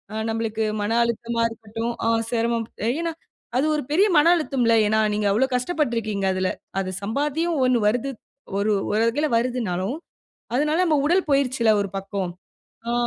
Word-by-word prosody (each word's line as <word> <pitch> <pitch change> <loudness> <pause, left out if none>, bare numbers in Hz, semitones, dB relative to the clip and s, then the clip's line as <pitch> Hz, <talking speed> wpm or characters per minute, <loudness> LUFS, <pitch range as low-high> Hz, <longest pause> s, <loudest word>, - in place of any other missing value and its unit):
ஆ - - -4
நம்மளுக்கு 225 -1 -1 0.2
மன 225 +3 0
அழுத்தமா 235 0 -2
இருக்கட்டும், 225 +1 -5
ஆ - - +3 0.2
செரமம் 230 -1 0 0.3
ஏன்னா 335 -1 -2 0.5
அது 280 - +2
ஒரு 300 - -2
பெரிய 390 +6 +5
மன 295 - +5
அழுத்தம்ல, 260 -8 +1
ஏன்னா 220 +1 +2
நீங்க 210 0 0
அவ்ளோ 235 +6 +3
கஷ்டப்பட்ருக்கீங்க 235 - -1
அதுல. 185 0 0 0.3
அது 185 -1 -3
சம்பாத்தியம் 295 +9 -1
ஒண்ணு 250 -2 +3
வருது 245 +5 0 0.5
ஒரு 210 +2 +1 0.2
ஒரு 215 - +2
வகைல 295 +7 0
வருதுனாலும், 230 -3 -1 0.6
அதனால 300 +4 +1
நம்ம 305 -3 +3
உடல் 360 +4 +2
போயிருச்சுல 260 -5 +2
ஒரு 200 - -4
பக்கம் 195 -2 -4 0.6
ஆ. - - 0
235 Hz, 150 wpm, -23 LUFS, 220-280 Hz, 0.6 s, பெரிய